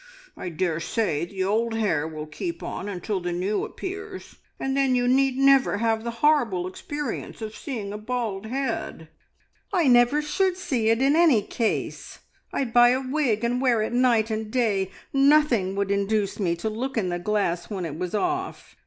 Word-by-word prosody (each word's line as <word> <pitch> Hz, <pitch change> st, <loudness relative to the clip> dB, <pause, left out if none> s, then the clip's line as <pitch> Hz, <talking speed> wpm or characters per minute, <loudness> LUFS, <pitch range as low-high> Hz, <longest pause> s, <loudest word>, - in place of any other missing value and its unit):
I 180 Hz, -, -5 dB
daresay 170 Hz, +1 st, -1 dB
the 190 Hz, +1 st, -3 dB
old 225 Hz, +4 st, 0 dB
hair 210 Hz, -8 st, 0 dB
will 155 Hz, -1 st, -6 dB
keep 340 Hz, -, -5 dB
on 205 Hz, -, -5 dB
until 195 Hz, +1 st, -3 dB
the 175 Hz, 0 st, -3 dB
new 190 Hz, +4 st, -1 dB
appears, 390 Hz, +1 st, -7 dB, 0.2 s
and 270 Hz, 0 st, -1 dB
then 270 Hz, -2 st, +2 dB
you 245 Hz, 0 st, +1 dB
need 265 Hz, +1 st, +3 dB
never 275 Hz, -5 st, +4 dB
have 225 Hz, 0 st, 0 dB
the 235 Hz, -, -3 dB, 0.2 s
horrible 235 Hz, -, +3 dB
experience 285 Hz, +8 st, -5 dB
of 220 Hz, -1 st, -6 dB
seeing 220 Hz, -9 st, -5 dB
a 210 Hz, -, -5 dB
bald 220 Hz, -3 st, -3 dB
head." 230 Hz, -, -3 dB, 0.6 s
"I 350 Hz, -7 st, +2 dB
never 245 Hz, +4 st, +5 dB
should 370 Hz, +4 st, 0 dB
see 240 Hz, -11 st, 0 dB
it 225 Hz, +3 st, +2 dB
in 280 Hz, +2 st, +4 dB
any 315 Hz, -11 st, +5 dB
case. 225 Hz, +1 st, -3 dB, 0.3 s
I'd 245 Hz, -4 st, -2 dB
buy 240 Hz, 0 st, +7 dB
a 255 Hz, +1 st, +2 dB
wig 255 Hz, -6 st, 0 dB
and 245 Hz, +2 st, 0 dB
wear 240 Hz, -5 st, +3 dB
it 220 Hz, -, -3 dB
night 240 Hz, -3 st, +3 dB
and 220 Hz, 0 st, -3 dB
day. 215 Hz, -6 st, +1 dB, 0.2 s
Nothing 275 Hz, -9 st, +3 dB
would 200 Hz, 0 st, -1 dB
induce 200 Hz, +1 st, 0 dB
me 175 Hz, -4 st, +1 dB
to 170 Hz, +5 st, -4 dB
look 245 Hz, +4 st, -3 dB
in 190 Hz, -5 st, 0 dB
the 175 Hz, 0 st, -2 dB
glass 180 Hz, -3 st, -1 dB
when 190 Hz, -4 st, -3 dB
it 160 Hz, -, -5 dB
was 180 Hz, +2 st, -3 dB
off. 365 Hz, -, -3 dB
225 Hz, 180 wpm, -25 LUFS, 195-270 Hz, 0.6 s, buy